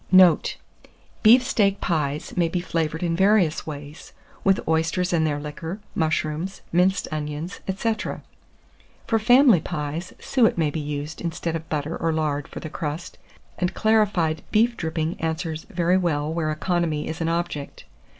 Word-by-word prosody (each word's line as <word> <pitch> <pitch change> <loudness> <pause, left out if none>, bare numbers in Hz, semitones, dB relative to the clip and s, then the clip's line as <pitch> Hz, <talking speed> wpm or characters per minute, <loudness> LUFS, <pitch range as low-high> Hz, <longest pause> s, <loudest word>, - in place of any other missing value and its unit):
Note. 185 -3 +6 0.6
Beef 240 +3 +7
steak 200 -5 +2
pies 150 -3 -2
may 175 -2 +2
be 180 - -1
flavoured 160 -2 -2
in 170 -1 0
various 190 -4 +3
ways, 145 0 -8 0.3
with 195 -1 +4
oysters 165 +3 +1
and 160 -2 +3
their 145 -1 -1
liquor, 160 +6 -6
mushrooms, 160 +3 -1
minced 180 +2 +2
onions, 150 +3 -4 0.2
&c. 225 +2 +1 1.1
For 225 - +2
family 245 - +6
pies, 160 +2 -4
suet 240 -8 +2
may 155 -3 +1
be 160 - -3
used 145 +1 -5
instead 165 -1 -3
of 160 -1 -6
butter 150 +1 -2
or 165 - 0
lard 150 -2 -1
for - - -8
the - - -5
crust, 155 +2 -5 0.4
and 180 0 -1
clarified 205 -8 +2
beef 230 +2 +3
dripping 160 0 -3
answers 160 0 -3
very 180 -2 +2
well 155 -4 0
where 160 -2 -1
economy 160 -1 -1
is 160 - -5
an 165 - +1
object. 170 -4 -3
165 Hz, 150 wpm, -24 LUFS, 155-185 Hz, 1.1 s, Beef